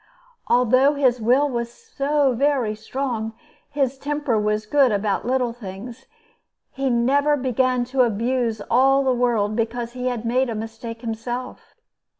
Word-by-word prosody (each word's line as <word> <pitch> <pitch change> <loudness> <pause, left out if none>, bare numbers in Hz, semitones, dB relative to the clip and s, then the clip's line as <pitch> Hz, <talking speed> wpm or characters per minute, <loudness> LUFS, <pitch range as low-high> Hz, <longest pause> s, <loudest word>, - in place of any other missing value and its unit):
Although 255 +4 +4
his 255 -4 +2
will 255 +6 +3
was 235 -3 -3
so 290 - 0
very 260 -3 +1
strong, 225 0 -4 0.4
his 275 -2 -1
temper 290 -6 -1
was 210 0 -1
good 270 +1 +3
about 205 +1 -1
little 250 -2 0
things, 230 +3 -9 0.7
and 270 - -5
he - - +3
never 280 +5 +2
began 255 -1 +1
to 255 +1 0
abuse 230 0 0
all 270 +5 +3
the 260 -1 +2
world 230 -4 +1
because 230 +1 -2
he 250 0 -4
had 240 -2 -3
made 250 +2 +1
a 230 - -3
mistake 225 +1 -7
himself. 240 +2 -6
245 Hz, 150 wpm, -22 LUFS, 225-265 Hz, 0.7 s, Although